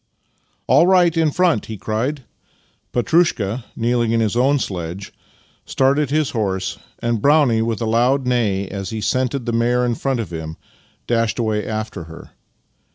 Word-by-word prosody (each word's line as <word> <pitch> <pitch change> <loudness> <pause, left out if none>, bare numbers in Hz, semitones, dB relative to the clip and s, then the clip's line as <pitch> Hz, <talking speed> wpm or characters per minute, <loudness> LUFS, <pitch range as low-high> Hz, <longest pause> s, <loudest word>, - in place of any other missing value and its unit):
" - - -44
All 150 +7 +5
right 180 -3 +4
in 160 -1 +3
front! 170 - +1
" - - -17
he 110 - -6
cried. 125 +8 -2 0.7
Petrushka, 120 - +1
kneel 120 +1 0
ing 115 -1 0
in 115 - +2
his 110 -1 0
own 135 +4 +3
sledge, 95 -4 -5 0.5
started 140 +1 +1
his 150 0 0
horse, 95 -5 -2 0.2
and 115 -2 -1
Brownie, 140 -5 +4
with 115 -1 -2
a - - 0
loud 125 +4 +2
neigh 110 -6 0
as 95 -1 -5
he 110 - -4
scented 130 +3 -1
the 120 - -2
mare 120 +2 +2
in 120 - 0
front 130 +2 -2
of 100 -7 -5
him, 80 -1 -6 0.5
dashed 115 -3 0
away 110 -2 -1
after 110 -6 -4
her. 80 0 -12
115 Hz, 170 wpm, -20 LUFS, 105-135 Hz, 0.7 s, All